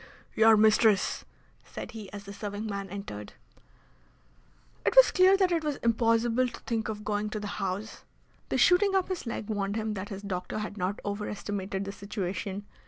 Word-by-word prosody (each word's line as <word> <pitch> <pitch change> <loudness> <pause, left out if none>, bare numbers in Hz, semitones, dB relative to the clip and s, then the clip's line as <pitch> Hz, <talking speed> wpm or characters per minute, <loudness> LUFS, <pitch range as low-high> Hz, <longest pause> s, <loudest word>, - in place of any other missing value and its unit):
"Your 220 0 +6
mistress!" 215 -1 +3 0.4
said - - -8
he 215 -4 -9
as 200 0 -8
the 200 0 -9
serving 205 +1 -5
man 200 -2 -4
entered. 175 - -7 1.5
It - - +1
was - - +8
clear 375 +1 +6
that 375 -2 +3
it 335 -2 +1
was 300 -2 -1
impossible 230 +1 +2
to - - -9
think 225 -2 -2
of 210 -1 -5
going 210 0 -1
to 215 - -4
the 205 -1 -5
House. 195 +3 -4 0.5
The - - 0
shooting 390 +2 +4
up 380 -1 +1
his 365 -9 -4
leg 230 -2 -4
warned 200 -2 -2
him 220 -1 -2
that 200 0 -5
his 195 0 -7
doctor 185 -1 -4
had 210 -1 -4
not 190 0 -2
overestimated 200 -1 -3
the 200 - -4
situation. 200 0 -4
210 Hz, 175 wpm, -29 LUFS, 200-230 Hz, 1.5 s, was